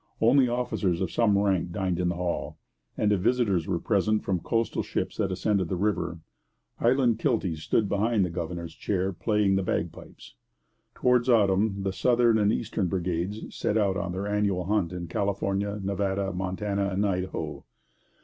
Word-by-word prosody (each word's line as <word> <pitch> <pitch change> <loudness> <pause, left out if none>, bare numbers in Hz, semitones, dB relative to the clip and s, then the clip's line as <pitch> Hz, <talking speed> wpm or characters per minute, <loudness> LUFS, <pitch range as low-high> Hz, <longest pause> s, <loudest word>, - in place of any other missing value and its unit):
Only 125 +3 +5
officers 120 -7 -1
of 95 -3 -2
some 105 -4 +3
rank 95 -4 +1
dined 90 -2 -1
in 90 -1 +1
the 85 - -2
Hall; 90 0 -3 0.4
and 105 - +2
if 100 - +2
visitors 105 -6 +1
were 90 - 0
present 105 +3 +1
from 95 -2 0
coastal 115 +6 -1
ships - - -3
that 95 - 0
ascended 95 -1 0
the - - -1
river, 85 -4 -1 0.6
Highland 120 -2 +3
kilties 100 - 0
stood 105 +6 +1
behind 105 0 +1
the 90 - -4
governor's 85 0 -5
chair 95 -1 -1
playing 105 0 +1
the - - +1
bagpipes. 85 -3 -5 0.6
Towards 125 0 +2
autumn 100 -2 +3
the 95 -1 -1
southern 120 +1 +3
and 105 0 +3
eastern 110 -4 -1
brigades 90 +3 -3
set 105 - 0
out 100 -3 +2
on 95 -2 -2
their 95 +3 -3
annual 100 -3 0
hunt 100 -3 0
in 90 -1 -5
California, 100 +2 -1
Nevada, 100 0 -1
Montana, 100 +2 -2
and 100 +2 0
Idaho. 95 -1 -3
100 Hz, 165 wpm, -27 LUFS, 90-105 Hz, 0.6 s, Only